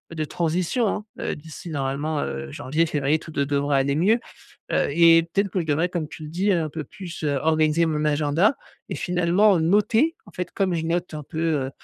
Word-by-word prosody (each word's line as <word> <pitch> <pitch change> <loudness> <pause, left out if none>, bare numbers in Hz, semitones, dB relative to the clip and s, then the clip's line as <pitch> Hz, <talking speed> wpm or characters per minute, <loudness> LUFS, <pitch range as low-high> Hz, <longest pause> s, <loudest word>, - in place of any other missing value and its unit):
de 155 - -1
transition, 175 - 0
hein. 210 - -2
Heu, - - -2
d'ici 160 +2 -10
normalement, 145 +1 -2
heu, 70 0 -4
janvier, 155 - 0
février, 150 0 0
tout 160 - -11
de 140 - 0
devrait 140 0 +1
aller 140 +1 +1
mieux. 205 +9 +3 0.5
Heu, - - +2
et 165 +2 +6
peut-être 200 0 +2
que 185 - -1
je 160 - -4
devrais 160 +4 +1
comme 170 -4 -3
tu 155 - -9
le - - -7
dis, 190 +5 0
heu 175 -4 +3
un 155 - -4
peu 155 0 -5
plus 180 +1 -9
heu, 145 -1 +1
organiser 155 +1 +3
mon 150 -1 -1
agenda. 150 - +2 0.3
Et - - -4
finalement 180 +3 +3
noter, 220 - +2
en - - -13
fait, 180 - -4
comme 190 -3 0
je 160 - -2
note 175 +1 -1
un 150 - -5
peu, 155 +3 -8 0.3
heu, - - -6
160 Hz, 220 wpm, -24 LUFS, 150-180 Hz, 0.5 s, et